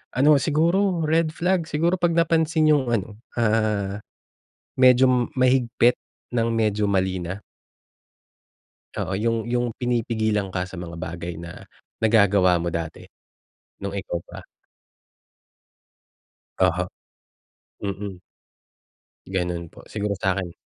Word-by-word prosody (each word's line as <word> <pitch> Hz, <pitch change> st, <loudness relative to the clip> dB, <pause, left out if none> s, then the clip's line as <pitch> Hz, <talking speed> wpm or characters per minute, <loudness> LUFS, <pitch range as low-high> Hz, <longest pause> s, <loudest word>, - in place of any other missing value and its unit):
Ano 140 Hz, +4 st, +4 dB
siguro 170 Hz, +4 st, +2 dB
red 160 Hz, 0 st, +2 dB
flag 180 Hz, -2 st, 0 dB
siguro 170 Hz, +4 st, +1 dB
pag 170 Hz, -1 st, +2 dB
napansin 160 Hz, -1 st, +3 dB
'yung 140 Hz, -4 st, +2 dB
ano, 105 Hz, -1 st, -2 dB, 0.2 s
ah, 105 Hz, -3 st, +1 dB, 0.8 s
medyo 130 Hz, 0 st, +6 dB, 0.2 s
mahigpit 125 Hz, -2 st, +3 dB, 0.4 s
ng 115 Hz, 0 st, +2 dB
medyo 105 Hz, -2 st, +1 dB
mali 95 Hz, -2 st, +1 dB
na. 90 Hz, +4 st, -5 dB, 1.6 s
Oo, 95 Hz, -, -2 dB
'yung 115 Hz, +1 st, +1 dB
'yung 120 Hz, 0 st, +1 dB
pinipigilan 110 Hz, -4 st, 0 dB
ka 90 Hz, -, 0 dB
sa 95 Hz, -, -8 dB
mga 85 Hz, -1 st, -7 dB
bagay 85 Hz, 0 st, -5 dB
na 85 Hz, 0 st, -10 dB, 0.3 s
nagagawa 100 Hz, -5 st, +4 dB
mo 85 Hz, -, -1 dB
dati, 80 Hz, -1 st, -5 dB, 0.8 s
nung 100 Hz, -, -2 dB
ikaw 85 Hz, -3 st, -4 dB
pa. -, -, -12 dB, 2.1 s
Oho, 90 Hz, -1 st, +2 dB, 0.9 s
mm. 100 Hz, -2 st, -5 dB, 1.1 s
Gano'n 90 Hz, -3 st, -3 dB
po, -, -, -14 dB
siguro 105 Hz, -1 st, -2 dB
sa'kin. 95 Hz, -2 st, -1 dB
110 Hz, 105 wpm, -24 LUFS, 95-130 Hz, 2.1 s, medyo